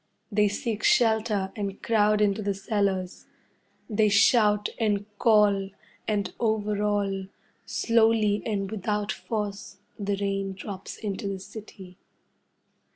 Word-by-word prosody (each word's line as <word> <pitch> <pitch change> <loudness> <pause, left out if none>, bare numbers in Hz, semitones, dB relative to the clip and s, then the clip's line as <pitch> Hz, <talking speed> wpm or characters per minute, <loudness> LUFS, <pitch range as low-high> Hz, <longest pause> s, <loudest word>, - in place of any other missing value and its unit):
They 210 0 +3
seek 210 +1 -3
shelter 220 -4 +2
and 200 -2 -4
crowd 215 -2 +3
into 205 0 +2
the 200 -1 -1
cellars. 195 -2 -2 0.6
They 215 -1 +2
shout 210 0 +4
and 205 -3 +1
call, 205 -3 +4 0.4
and 205 -3 -1
over 210 -2 0
all, 200 -2 0 0.4
slowly 220 -2 +2
and 200 -3 -2
without 210 0 -2
force, 210 -2 -5 0.2
the 200 -1 -1
rain 195 -1 -2
drops 195 0 -8
into 200 -1 -4
the 195 -1 -3
city. 195 -2 -11
205 Hz, 115 wpm, -26 LUFS, 195-215 Hz, 0.6 s, shout